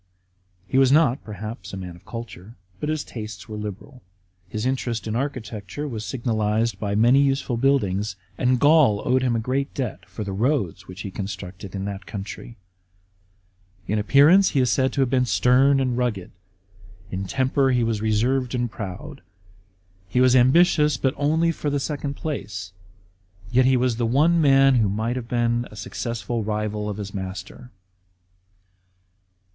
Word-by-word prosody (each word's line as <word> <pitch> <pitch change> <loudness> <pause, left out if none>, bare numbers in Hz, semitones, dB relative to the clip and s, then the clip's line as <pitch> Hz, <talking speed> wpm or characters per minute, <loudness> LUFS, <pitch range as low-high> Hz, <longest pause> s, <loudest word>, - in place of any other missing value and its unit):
He 130 - +2
was 135 -1 +5
not, 145 -4 +3
perhaps, 105 -1 -7
a - - -4
man 90 -2 -7
of 85 - -19
culture, 115 -2 -8 0.2
but 150 - -3
Ms 155 -1 -1
tastes 105 -5 -8
were 110 - -7
liberal. 105 +5 -7 0.5
His 110 +1 -3
interest 125 -3 -2
in 110 0 -3
architecture 120 -2 -4
was 110 -6 -5
signalised 110 -3 -1
by 100 -1 -2
many 120 +6 +5
useful 135 -2 0
buildings; 110 -7 +1 0.2
and 125 +2 +1
Gaul 145 -8 +4
owed 130 +1 +3
him 125 -2 +1
a - - +1
great 130 +5 -2
debt 125 -7 -4
for 95 +3 -6
the 100 - -5
roads 100 - -1
which 95 +1 -9
he 100 - -6
constructed 95 -1 -7
in 95 0 -3
that 100 -2 -6
country. 105 +3 -7 1.3
In 105 +4 0
appearance 145 - +5
he 140 - 0
is 125 -2 +2
said 130 -1 +2
to 140 - 0
have 130 - +2
been 125 -2 +2
stern 135 +4 +4
and 130 -2 0
rngized; 120 -7 -2 0.8
in 95 +1 -3
temper 135 +4 +1
he 125 -2 +2
was 115 -2 -1
reserved 120 +4 +1
and 120 -2 -1
proud. 95 -3 -7 0.9
He 125 - +1
was 130 0 +5
ambitious, 150 +2 +4
but 130 +1 0
only 160 +4 +2
for 150 -2 -3
the 145 0 0
second 145 0 -3
place; 100 - -5 0.8
yet 130 +1 +4
he 130 0 +4
was 125 -2 +1
the 120 -1 0
one 160 +8 +3
man 135 -2 +5
who 110 -4 +2
might 110 +5 -1
have 125 -2 -5
been 120 0 0
a - - -13
successful 115 +1 -4
rival 105 0 -2
of 105 - -4
his 100 -2 -6
master. 95 +5 -7
120 Hz, 165 wpm, -23 LUFS, 105-135 Hz, 1.3 s, was